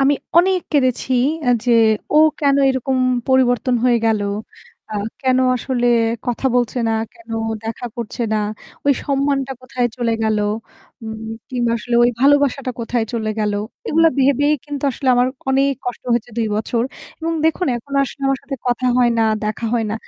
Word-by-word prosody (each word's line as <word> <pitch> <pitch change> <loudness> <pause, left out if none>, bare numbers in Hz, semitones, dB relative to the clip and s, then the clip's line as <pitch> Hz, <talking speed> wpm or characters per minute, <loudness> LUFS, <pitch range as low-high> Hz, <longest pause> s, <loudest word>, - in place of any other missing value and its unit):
আমি 275 +1 +4 0.2
অনেক 370 +1 +3
কেঁদেছি 260 -2 +1 0.4
আ - - +6
যে 245 - +3 0.4
ও - - +5 0.2
কেনো 280 -1 +3
এরকম 260 0 -1 0.3
পরিবর্তন 255 -1 +3
হয়ে 240 -2 +4
গেলো, 215 -2 +1 0.7
আ - - -6 0.3
কেনো 260 -1 +2
আসলে 245 0 -1 0.4
কথা 245 +2 -1
বলছে 245 0 0
না, 225 - +1 0.2
কেনো 230 -1 -9 0.3
দেখা 225 +2 -4
করছে 235 +1 -4
না 215 - +2 0.5
ওই 280 - +6
সম্মানটা 275 -1 0
কোথায় 255 -1 -1
চলে 235 -2 0
গেলো 215 -1 +1 0.6
উ - - -7 0.4
কিংবা 240 -2 0
আসলে 240 +3 -3
ওই 240 - +5
ভালোবাসাটা 275 -1 +3
কোথায় 235 0 -1
চলে 220 -2 -1
গেলো 210 -1 0 0.3
এগুলো 330 +1 +4
ভেবেই 285 +2 +3
কিন্তু 290 -2 -6
আসলে 265 +1 -3
আমার 245 0 +3 0.2
অনেক 275 +1 +3
কষ্ট 245 - -4
হয়েছে 235 0 -1
২ 225 - +1
বছর 230 +2 -1 0.4
এবং 330 +1 -1
দেখুন 320 +3 +1
এখন 240 +4 -11
আসলে 275 +1 -6
আমার 270 0 +1
সাথে 275 - -5
কথা 245 +1 0
হয় 245 -1 +4
না, - - +4 0.2
দেখা 215 +2 -2
হয় 230 -2 +1
না, - - -1
255 Hz, 165 wpm, -19 LUFS, 235-275 Hz, 0.7 s, আ